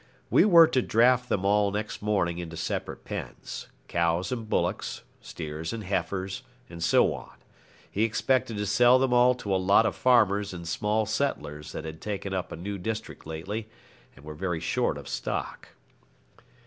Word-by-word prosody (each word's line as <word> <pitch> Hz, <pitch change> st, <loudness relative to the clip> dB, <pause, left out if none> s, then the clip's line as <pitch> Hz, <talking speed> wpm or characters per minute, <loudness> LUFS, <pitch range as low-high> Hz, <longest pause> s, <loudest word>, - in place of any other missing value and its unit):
We -, -, +6 dB
were 170 Hz, -5 st, +8 dB
to 130 Hz, -5 st, +1 dB
draft 125 Hz, +2 st, +3 dB
them 100 Hz, -1 st, 0 dB
all 100 Hz, 0 st, +3 dB
next 105 Hz, +2 st, -4 dB
morning 95 Hz, -5 st, 0 dB
into 85 Hz, -1 st, -6 dB
separate 80 Hz, -, -4 dB
pens -, -, -6 dB, 0.2 s
cows 85 Hz, +3 st, 0 dB
and 115 Hz, -4 st, -4 dB
bullocks, -, -, -1 dB, 0.2 s
steers 80 Hz, +1 st, -6 dB
and 115 Hz, -2 st, -5 dB
heifers, 95 Hz, +2 st, -2 dB, 0.3 s
and 85 Hz, -1 st, -6 dB
so -, -, +4 dB
on. -, -, -9 dB, 0.6 s
He 100 Hz, -, -2 dB
expected 115 Hz, +1 st, +1 dB
to 105 Hz, -, -1 dB
sell 120 Hz, +5 st, +5 dB
them 130 Hz, -1 st, +1 dB
all 125 Hz, +1 st, +5 dB
to 100 Hz, -5 st, -3 dB
a 95 Hz, -, +2 dB
lot 100 Hz, +4 st, +5 dB
of -, -, 0 dB
farmers 105 Hz, -6 st, +3 dB
and 85 Hz, -1 st, -7 dB
small 105 Hz, +6 st, 0 dB
settlers 100 Hz, -, -2 dB
that 80 Hz, -, -5 dB
had 80 Hz, 0 st, -8 dB
taken 100 Hz, -2 st, -4 dB
up 95 Hz, -1 st, -3 dB
a -, -, -4 dB
new 100 Hz, +4 st, -5 dB
district 110 Hz, -2 st, -5 dB
lately 100 Hz, +8 st, -5 dB, 0.5 s
and 65 Hz, -, -16 dB
were 75 Hz, -, -7 dB
very 90 Hz, +1 st, -2 dB
short 80 Hz, -, 0 dB
of -, -, -9 dB
stock. -, -, -4 dB
100 Hz, 175 wpm, -27 LUFS, 85-115 Hz, 0.6 s, were